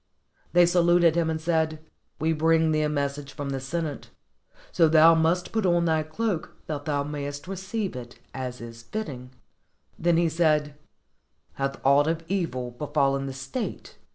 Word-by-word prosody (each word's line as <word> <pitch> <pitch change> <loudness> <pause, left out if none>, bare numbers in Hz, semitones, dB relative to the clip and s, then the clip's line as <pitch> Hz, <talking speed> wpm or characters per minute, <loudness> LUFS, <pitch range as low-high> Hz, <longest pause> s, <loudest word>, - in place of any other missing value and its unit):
They 175 0 +7
saluted 175 -1 +4
him 170 -1 +1
and 160 0 -1
said, 160 -1 0 0.4
"We 160 +1 +1
bring 160 0 +3
thee 155 0 +2
a 150 - +1
message 140 -1 -3
from 145 -2 -5
the 135 - -2
Sen 160 +6 -3
ate, 145 -2 -7 0.6
so 165 - +4
thou 160 +1 +7
must 165 +2 +1
put 220 -1 0
on 175 -2 +2
thy 160 -1 +2
cloak 170 +3 -3
that 145 -2 -5
thou 145 -2 0
may 145 -1 -4
est 145 +3 -7
receive 195 - -4
it 120 -1 -9 0.2
as 125 -2 -5
is 115 0 -9
fitting." 130 - -6 0.7
Then 170 0 +2
he 170 0 +3
said, 155 -3 +1 0.8
"Hath 135 0 -3
aught 140 +2 +5
of 165 0 -1
evil 145 -11 -2
befallen 135 +1 0
the 135 - -5
state?" 135 - -6
155 Hz, 170 wpm, -26 LUFS, 140-170 Hz, 0.8 s, They